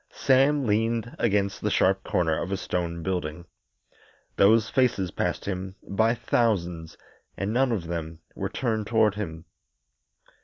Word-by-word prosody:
Sam 135 Hz, +1 st, +3 dB
leaned 115 Hz, +2 st, 0 dB
against 100 Hz, -3 st, +1 dB
the 105 Hz, -, 0 dB
sharp 95 Hz, -1 st, +2 dB
corner 80 Hz, -3 st, 0 dB
of 95 Hz, -, -4 dB
a 100 Hz, -, 0 dB
stone 85 Hz, -2 st, -3 dB
building. 85 Hz, -2 st, -3 dB, 0.9 s
Those 110 Hz, +2 st, +5 dB
faces 115 Hz, -8 st, +1 dB
passed -, -, -2 dB
him 95 Hz, -1 st, -4 dB
by 110 Hz, +4 st, +2 dB
thousands, 90 Hz, -9 st, -1 dB, 0.4 s
and 100 Hz, +3 st, -2 dB
none 130 Hz, +1 st, +2 dB
of 100 Hz, -7 st, -2 dB
them 80 Hz, -1 st, -5 dB, 0.2 s
were -, -, -4 dB
turned 110 Hz, -4 st, -2 dB
toward 110 Hz, -3 st, +3 dB
him. 80 Hz, -5 st, -6 dB
100 Hz, 140 wpm, -26 LUFS, 85-115 Hz, 0.9 s, Those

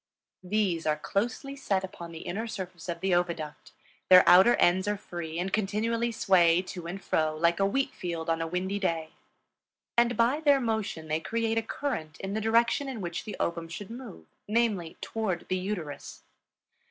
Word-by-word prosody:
These 180 Hz, -4 st, 0 dB
are 150 Hz, 0 st, +2 dB
closely 240 Hz, -, -2 dB
set 200 Hz, -9 st, -1 dB
upon 170 Hz, -3 st, -8 dB
the 160 Hz, -, -8 dB
inner 220 Hz, +6 st, -4 dB
surface 185 Hz, -4 st, -7 dB
of 170 Hz, 0 st, -4 dB
the 190 Hz, -1 st, +1 dB
oviduct; 170 Hz, -4 st, -2 dB, 0.4 s
their 185 Hz, -1 st, +9 dB
outer 190 Hz, +7 st, +8 dB
ends 185 Hz, +3 st, +3 dB
are 205 Hz, 0 st, 0 dB
free 170 Hz, -4 st, -6 dB
and 185 Hz, +2 st, -2 dB
continually 225 Hz, +3 st, 0 dB
sway 180 Hz, -5 st, +4 dB
to 175 Hz, -2 st, -7 dB
and 185 Hz, +3 st, -5 dB
fro 155 Hz, -4 st, 0 dB
like 170 Hz, +2 st, +2 dB
a 195 Hz, -, +3 dB
wheat 270 Hz, +7 st, 0 dB
field 170 Hz, -2 st, -4 dB
on 165 Hz, 0 st, 0 dB
a 165 Hz, -, -1 dB
windy 185 Hz, +4 st, -2 dB
day; 165 Hz, -5 st, -1 dB, 0.8 s
and 235 Hz, 0 st, +3 dB
by 240 Hz, +5 st, +3 dB
their 285 Hz, -3 st, +4 dB
motion 220 Hz, -9 st, -2 dB
they 155 Hz, +1 st, 0 dB
create 225 Hz, +5 st, 0 dB
a -, -, -1 dB
current 220 Hz, -, -4 dB
in 195 Hz, +1 st, -4 dB
the 220 Hz, -, -1 dB
direction 235 Hz, +5 st, +2 dB
in 255 Hz, -4 st, -5 dB
which 175 Hz, -3 st, -4 dB
the 210 Hz, -, -5 dB
ovum 170 Hz, -1 st, -2 dB
should 185 Hz, +5 st, -8 dB
move, 235 Hz, -, -9 dB, 0.2 s
namely, 210 Hz, -6 st, 0 dB
toward 205 Hz, -6 st, -3 dB
the 185 Hz, -, +1 dB
uterus. 180 Hz, -6 st, -5 dB
190 Hz, 180 wpm, -28 LUFS, 170-225 Hz, 0.8 s, their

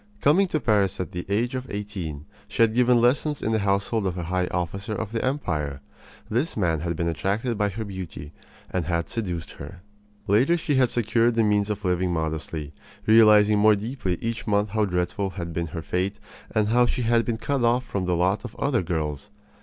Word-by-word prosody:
Coming 175 Hz, -, +4 dB
to 155 Hz, -, -1 dB
Paris 105 Hz, -7 st, +1 dB
at 90 Hz, -, -3 dB
the 90 Hz, 0 st, -6 dB
age 115 Hz, +5 st, 0 dB
of 130 Hz, 0 st, -4 dB
eighteen, 95 Hz, -8 st, -5 dB, 0.2 s
she -, -, +2 dB
had 110 Hz, -1 st, +3 dB
given 125 Hz, 0 st, +4 dB
lessons 140 Hz, +5 st, +1 dB
in 110 Hz, -, 0 dB
the 110 Hz, -, +2 dB
household 100 Hz, +1 st, 0 dB
of 90 Hz, -1 st, -3 dB
a 90 Hz, -, -3 dB
high 90 Hz, +2 st, -1 dB
officer 100 Hz, +5 st, -3 dB
of 110 Hz, -1 st, -4 dB
the 115 Hz, -, -2 dB
empire. 75 Hz, -, -2 dB, 0.5 s
This 125 Hz, +8 st, -1 dB
man 85 Hz, -6 st, +1 dB
had 85 Hz, +1 st, -2 dB
been 85 Hz, +1 st, -1 dB
attracted 100 Hz, -, -1 dB
by 105 Hz, -1 st, +1 dB
her 110 Hz, +3 st, -5 dB
beauty, 95 Hz, -6 st, -7 dB, 0.4 s
and 90 Hz, -3 st, -1 dB
had 85 Hz, 0 st, -1 dB
seduced 90 Hz, -8 st, -3 dB
her. 85 Hz, +6 st, -9 dB, 0.4 s
Later 125 Hz, -, +3 dB
she 155 Hz, -2 st, -1 dB
had 130 Hz, -2 st, +4 dB
secured 115 Hz, 0 st, +2 dB
the 115 Hz, -, +3 dB
means 105 Hz, -1 st, +2 dB
of 105 Hz, 0 st, -3 dB
living 90 Hz, 0 st, +1 dB
modestly, 80 Hz, -2 st, -3 dB, 0.3 s
realizing 105 Hz, -1 st, +6 dB
more 110 Hz, 0 st, +6 dB
deeply 100 Hz, -4 st, -3 dB
each 115 Hz, 0 st, -3 dB
month 105 Hz, 0 st, +2 dB
how 110 Hz, +1 st, +1 dB
dreadful 90 Hz, +1 st, -1 dB
had 85 Hz, -3 st, -6 dB
been 85 Hz, +1 st, -2 dB
her 80 Hz, +1 st, -6 dB
fate 95 Hz, +4 st, -1 dB, 0.3 s
and 105 Hz, -1 st, +1 dB
how 120 Hz, +2 st, +4 dB
she 125 Hz, -, -1 dB
had 115 Hz, 0 st, +3 dB
been 115 Hz, -1 st, -2 dB
cut 135 Hz, +2 st, -1 dB
off 120 Hz, +2 st, +2 dB
from 95 Hz, -2 st, -3 dB
the 90 Hz, -1 st, +1 dB
lot 95 Hz, +4 st, +1 dB
of -, -, -8 dB
other 140 Hz, -6 st, +1 dB
girls. 80 Hz, +1 st, -3 dB
105 Hz, 205 wpm, -25 LUFS, 90-115 Hz, 0.5 s, realizing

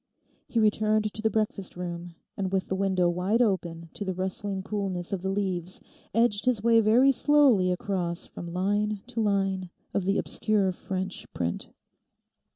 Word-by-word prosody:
He 230 Hz, -, 0 dB
returned 215 Hz, 0 st, +2 dB
to 215 Hz, -, -5 dB
the 220 Hz, -, +2 dB
breakfast 210 Hz, -3 st, -2 dB
room 175 Hz, -1 st, -6 dB, 0.2 s
and 190 Hz, -2 st, -2 dB
with 190 Hz, -1 st, -1 dB
the 190 Hz, -, 0 dB
window 190 Hz, -2 st, +2 dB
wide 180 Hz, +6 st, +1 dB
open 170 Hz, -7 st, 0 dB
to -, -, -5 dB
the 190 Hz, -2 st, -3 dB
rustling 190 Hz, +1 st, -3 dB
coolness 195 Hz, -3 st, -3 dB
of 190 Hz, -, -2 dB
the 190 Hz, -, -2 dB
leaves, 185 Hz, -3 st, -2 dB, 0.4 s
edged 225 Hz, -3 st, +2 dB
his 240 Hz, -5 st, +1 dB
way 230 Hz, -1 st, +5 dB
very 240 Hz, +6 st, +5 dB
slowly 265 Hz, -10 st, +4 dB
across 180 Hz, -3 st, -2 dB
from 175 Hz, -, -8 dB
line 205 Hz, +3 st, 0 dB
to 240 Hz, -2 st, -3 dB
line 195 Hz, -3 st, 0 dB, 0.2 s
of 200 Hz, -, 0 dB
the 195 Hz, +1 st, +2 dB
obscure 205 Hz, -3 st, +1 dB
French 185 Hz, +1 st, -5 dB
print. 85 Hz, -1 st, -2 dB
195 Hz, 160 wpm, -27 LUFS, 185-215 Hz, 0.4 s, way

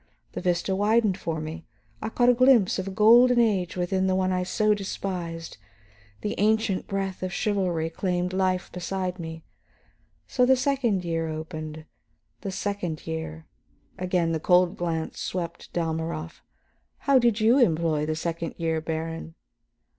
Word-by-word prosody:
The -, -, -5 dB
vista 180 Hz, +2 st, 0 dB
widened 210 Hz, 0 st, +3 dB
for 165 Hz, -2 st, -3 dB
me; 155 Hz, +2 st, -7 dB, 0.3 s
I 220 Hz, -, -2 dB
caught 245 Hz, +2 st, +3 dB
a -, -, +7 dB
glimpse 245 Hz, -6 st, +4 dB
of 190 Hz, -, -3 dB
a -, -, -1 dB
golden 240 Hz, +5 st, +6 dB
age 195 Hz, -7 st, +1 dB
within 185 Hz, +1 st, 0 dB
the 185 Hz, -, +2 dB
one 185 Hz, 0 st, +1 dB
I 180 Hz, 0 st, +1 dB
so 210 Hz, +4 st, +2 dB
despised, 180 Hz, -, -5 dB, 0.6 s
the 210 Hz, -, -2 dB
ancient 215 Hz, -1 st, +1 dB
breath 195 Hz, -1 st, -3 dB
of 185 Hz, 0 st, -3 dB
chivalry 185 Hz, -6 st, 0 dB
claimed 180 Hz, 0 st, -1 dB
life 185 Hz, -1 st, 0 dB
beside 185 Hz, 0 st, -3 dB
me. 160 Hz, -1 st, -7 dB, 0.8 s
So 250 Hz, -, +1 dB
the 260 Hz, +1 st, +6 dB
second 250 Hz, -8 st, 0 dB
year 165 Hz, -1 st, -1 dB
opened. 155 Hz, -1 st, -6 dB, 0.5 s
The 195 Hz, -, -5 dB
second 185 Hz, -5 st, -3 dB
year 160 Hz, 0 st, -5 dB, 0.3 s
" -, -, -37 dB
again 175 Hz, -2 st, +2 dB
the 160 Hz, -, 0 dB
cold 180 Hz, +2 st, +3 dB
glance 165 Hz, -2 st, -3 dB
swept 170 Hz, -2 st, -5 dB
Dalmorov. 160 Hz, -1 st, -3 dB, 0.6 s
"How 275 Hz, -2 st, +6 dB
did 235 Hz, -2 st, +2 dB
you 230 Hz, +5 st, +5 dB
employ 160 Hz, -, +2 dB
the 155 Hz, -, -1 dB
second 165 Hz, 0 st, -3 dB
year, 160 Hz, -1 st, -1 dB
Baron?" 165 Hz, 0 st, -4 dB
180 Hz, 155 wpm, -26 LUFS, 165-205 Hz, 0.8 s, a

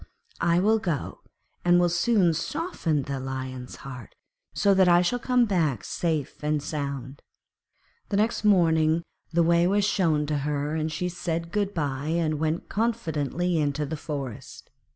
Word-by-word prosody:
I 170 Hz, 0 st, +2 dB
will 220 Hz, +4 st, +3 dB
go 170 Hz, -9 st, -3 dB, 0.4 s
and 175 Hz, 0 st, +5 dB
will 175 Hz, -, +4 dB
soon 175 Hz, 0 st, +3 dB
soften 170 Hz, -, -2 dB
the 140 Hz, 0 st, -4 dB
Lion's 130 Hz, -1 st, -5 dB
heart, 125 Hz, -5 st, -9 dB, 0.4 s
so 200 Hz, -, +3 dB
that 190 Hz, -1 st, +5 dB
I 175 Hz, 0 st, +5 dB
shall 245 Hz, +8 st, 0 dB
come 250 Hz, 0 st, +3 dB
back 160 Hz, -, 0 dB
safe 155 Hz, -4 st, -2 dB
and 150 Hz, 0 st, +1 dB
sound.' 140 Hz, -3 st, -5 dB, 0.9 s
The 200 Hz, -, 0 dB
next 220 Hz, +2 st, +1 dB
morning 165 Hz, -5 st, +3 dB, 0.3 s
the 170 Hz, +1 st, +3 dB
way 170 Hz, +1 st, +4 dB
was 200 Hz, +1 st, +2 dB
shown 165 Hz, -7 st, +2 dB
to 150 Hz, -1 st, -1 dB
her, 145 Hz, +1 st, -2 dB
and 160 Hz, 0 st, -1 dB
she 170 Hz, +4 st, -2 dB
said 170 Hz, -1 st, -3 dB
good 205 Hz, 0 st, -1 dB
bye 140 Hz, -2 st, -2 dB
and 155 Hz, -3 st, 0 dB
went 160 Hz, +2 st, -1 dB
confidently 180 Hz, -, -1 dB
into 150 Hz, 0 st, 0 dB
the 155 Hz, +3 st, -4 dB
forest. 140 Hz, -6 st, -7 dB
165 Hz, 155 wpm, -26 LUFS, 145-180 Hz, 0.9 s, and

